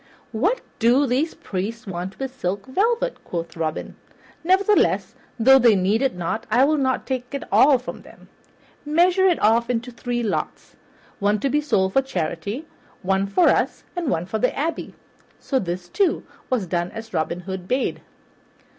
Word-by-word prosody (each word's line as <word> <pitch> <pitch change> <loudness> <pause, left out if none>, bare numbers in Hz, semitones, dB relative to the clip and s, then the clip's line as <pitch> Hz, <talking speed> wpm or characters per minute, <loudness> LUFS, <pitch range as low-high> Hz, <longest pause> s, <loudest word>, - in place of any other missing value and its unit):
"What 380 - 0 0.2
do 245 +5 +4
these 270 +6 0
priests 210 +5 -5
want 185 0 -6
of 270 -1 -3
silk 195 -4 -3
velvet?" 455 - 0
quoth 170 -1 -5
Robin. 160 -2 -4 0.5
"Nevertheless, 385 +4 +3 0.3
though 265 +4 +7
they 235 -4 +5
need 200 +5 +1
it 270 -7 +1
not, 180 +6 -3
I 245 +5 +5
will 305 +1 +2
not 260 -1 0
take 255 -2 -4 0.2
all 275 -1 +6
from 250 - -8
them. - - -17 0.6
Measure 355 +5 +3
it 355 - +3
off 230 +3 +3
into 245 0 -2
three 240 0 -3
lots, 215 - -3 0.4
one 205 +1 +2
to 275 - +1
be 295 - +2
sold 190 -10 +1
for 270 - +4
charity, 200 - -4 0.4
one 195 +1 +1
for 345 - +4
us, - - 0
and 345 -5 -2
one 165 -4 0
for 220 +4 -3
the 250 - 0
abbey." 320 +4 -3 0.4
So 270 - 0
this, 175 -2 -4
too, 390 - +1 0.3
was 245 -7 0
done 175 0 -1
as 225 0 -9
Robin 170 +1 -1
Hood 190 0 -6
bade. 255 +4 -1
235 Hz, 165 wpm, -23 LUFS, 190-275 Hz, 0.6 s, though